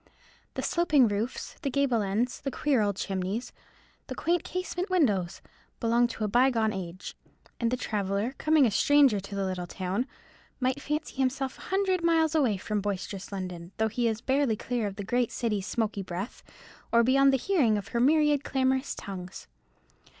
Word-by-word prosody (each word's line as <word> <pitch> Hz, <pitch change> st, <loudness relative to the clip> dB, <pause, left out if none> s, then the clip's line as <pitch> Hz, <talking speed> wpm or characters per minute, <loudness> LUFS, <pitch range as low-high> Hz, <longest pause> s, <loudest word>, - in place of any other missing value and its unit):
The -, -, -3 dB
sloping 300 Hz, -7 st, +3 dB
roofs, 210 Hz, +4 st, -3 dB
the 285 Hz, -, -1 dB
gable 265 Hz, -4 st, +1 dB
ends, 210 Hz, +5 st, -1 dB
the 275 Hz, -, -2 dB
queer 275 Hz, -2 st, +1 dB
old 205 Hz, -1 st, +1 dB
chimneys, 195 Hz, +4 st, -3 dB, 0.5 s
the -, -, -5 dB
quaint 345 Hz, +1 st, 0 dB
casement 365 Hz, 0 st, -3 dB
windows, 205 Hz, -, +1 dB, 0.4 s
belong 235 Hz, +1 st, +3 dB
to 225 Hz, -2 st, -5 dB
a -, -, +1 dB
bygone 230 Hz, -1 st, +3 dB
age; 185 Hz, -1 st, -6 dB, 0.4 s
and 235 Hz, -, +1 dB
the 250 Hz, -, -1 dB
traveller, 205 Hz, +1 st, -1 dB
coming 310 Hz, -3 st, +4 dB
a 230 Hz, -, +2 dB
stranger 275 Hz, 0 st, +4 dB
to 200 Hz, +1 st, -8 dB
the 195 Hz, -1 st, -1 dB
little 185 Hz, -2 st, -3 dB
town, 190 Hz, +8 st, -2 dB, 0.5 s
might 260 Hz, +2 st, 0 dB
fancy 300 Hz, -1 st, -3 dB
himself 265 Hz, 0 st, -1 dB
a -, -, -11 dB
hundred 380 Hz, -2 st, +1 dB
miles 325 Hz, -2 st, +3 dB
away 260 Hz, -10 st, +2 dB
from 210 Hz, +2 st, -2 dB
boisterous 195 Hz, -1 st, -4 dB
London; 180 Hz, -2 st, -6 dB
though 220 Hz, 0 st, +1 dB
he 235 Hz, +2 st, 0 dB
is 225 Hz, -1 st, -1 dB
barely 270 Hz, -4 st, +1 dB
clear 235 Hz, 0 st, -2 dB
of 195 Hz, -, -6 dB
the 205 Hz, -, -5 dB
great 245 Hz, +3 st, 0 dB
city's 210 Hz, -5 st, -2 dB
smoky 215 Hz, -3 st, -1 dB
breath, 190 Hz, +4 st, -6 dB, 0.5 s
or 235 Hz, 0 st, +5 dB
beyond 275 Hz, +3 st, +5 dB
the 270 Hz, -, +3 dB
hearing 260 Hz, -, +2 dB
of 205 Hz, -, -6 dB
her 235 Hz, -, -1 dB
myriad 295 Hz, +2 st, +4 dB
clamorous 265 Hz, 0 st, 0 dB
tongues. 185 Hz, -3 st, -8 dB
235 Hz, 175 wpm, -28 LUFS, 200-275 Hz, 0.5 s, or